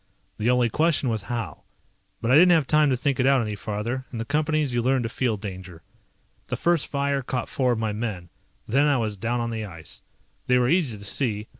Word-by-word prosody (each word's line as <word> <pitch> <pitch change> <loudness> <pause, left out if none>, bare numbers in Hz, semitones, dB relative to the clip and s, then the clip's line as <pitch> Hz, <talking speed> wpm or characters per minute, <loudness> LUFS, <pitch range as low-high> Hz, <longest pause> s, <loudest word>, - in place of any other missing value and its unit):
The 110 +3 +1
only 125 -1 +3
question 155 +2 +1
was 110 -2 -1
how. 120 -2 -4 0.6
But 115 - 0
I - - +5
didn't 175 +5 +7
have 160 -4 +3
time 150 +1 +3
to 130 - +1
think 135 +2 -1
it 130 - +3
out 135 -1 +5
any 105 - -3
farther. 105 +5 -4
In 120 - -6
the 115 - -3
Companies 150 -1 0
you 120 - +1
learn 130 +1 +1
to 115 - -2
feel 120 -2 -1
danger. 95 -4 -8 0.6
The - - -3
first 170 -3 +1
fire 140 -1 -1
caught 125 -1 -3
four 130 -4 +1
of - - -3
my 110 -1 -1
men. 105 -6 -4 0.4
Then 140 +6 +3
I 145 -2 +3
was 110 -3 -2
down 115 +4 -2
on 115 0 -2
the 110 -1 -3
ice. 85 -6 -9 0.5
They 125 - +4
were 125 0 +2
easy 155 -11 +1
to 100 - -10
see. 105 -2 -1
120 Hz, 230 wpm, -25 LUFS, 110-140 Hz, 0.6 s, didn't